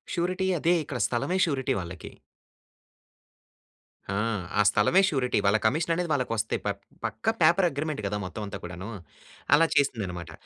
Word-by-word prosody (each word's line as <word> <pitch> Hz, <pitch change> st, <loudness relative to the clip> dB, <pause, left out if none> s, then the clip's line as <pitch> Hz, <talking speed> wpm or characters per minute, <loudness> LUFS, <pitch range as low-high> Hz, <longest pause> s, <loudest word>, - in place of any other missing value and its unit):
Surety 185 Hz, +2 st, 0 dB
అదే 170 Hz, +3 st, +3 dB
ఇక్కడ. 135 Hz, -4 st, -5 dB
స్థలమే 150 Hz, +10 st, -1 dB
surety 135 Hz, -5 st, -1 dB
వాళ్ళకి. 85 Hz, -2 st, -8 dB, 2.0 s
ఆ! 100 Hz, -, -1 dB, 0.4 s
ఆ -, -, +7 dB
స్థలమే 170 Hz, -, +4 dB
షూరిటీ 125 Hz, -6 st, 0 dB
వాళ్ళ 100 Hz, +2 st, +4 dB
కమిషన్ 160 Hz, +8 st, +2 dB
అనేది 175 Hz, -1 st, -2 dB
వాళ్ళకొస్తాయి. 115 Hz, -6 st, -1 dB
ప -, -, 0 dB, 0.4 s
పక్కా 225 Hz, -, -1 dB
పేపర్ 175 Hz, +3 st, +5 dB
అగ్రీమెంట్ 145 Hz, -3 st, -3 dB
కదా! 105 Hz, +1 st, -2 dB
మొత్తం 100 Hz, +4 st, -6 dB
అంతా 100 Hz, -, -6 dB
కూడాను. 90 Hz, +4 st, -7 dB, 0.7 s
అలా 165 Hz, +2 st, +4 dB
చేసిందన్నమాట. 95 Hz, -, 0 dB
130 Hz, 140 wpm, -27 LUFS, 105-165 Hz, 2.0 s, ఆ